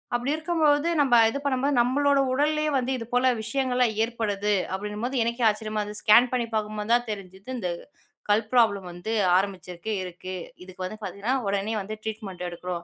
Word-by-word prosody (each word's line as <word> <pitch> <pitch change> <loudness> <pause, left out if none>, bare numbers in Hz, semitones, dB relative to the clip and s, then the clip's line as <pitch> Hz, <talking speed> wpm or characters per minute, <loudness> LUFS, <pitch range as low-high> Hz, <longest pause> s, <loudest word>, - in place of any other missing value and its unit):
அப்டி 245 +4 -1
இருக்கும்போது, 315 -2 +2
நம்ம 265 -4 +4
இது 280 - -3
பண்ணும்போது 275 +1 +1
நம்மளோட 280 +3 +2
உடல்லே 305 +3 +1
வந்து 260 0 -1
இதுபோல 245 +3 +1 0.2
விஷயங்கள்லாம் 250 -1 0
ஏற்படுது 210 -3 -1 0.2
அப்டின்னும்போது 210 +6 -3
எனக்கே 235 +1 -2
ஆச்சரியமா 215 0 -2
இருந்துது. 210 0 -7
ஸ்கேன் 235 +4 +6
பண்ணி 240 -2 0
பார்க்கும்போது 215 0 -2
தான் 240 0 -1
தெரிஞ்சுது. 195 +2 -9
இந்த 185 -6 -2 0.6
கல் 205 +2 +4
ப்ராப்ளம் 200 -6 +3
வந்து 175 +6 -6 0.3
ஆரம்பிச்சிருக்கு, 185 0 -3
இருக்கு. 185 +1 -7 0.3
இதுக்கு 185 0 -9
வந்து 215 +4 -6
பார்த்தீங்கன்னா, 205 +6 -2
உடனே 200 +2 -1
வந்து 215 +3 -6
ட்ரீட்மெண்ட் 210 -5 -6
எடுக்கறோம். 175 0 -5
220 Hz, 155 wpm, -26 LUFS, 200-255 Hz, 0.6 s, ஸ்கேன்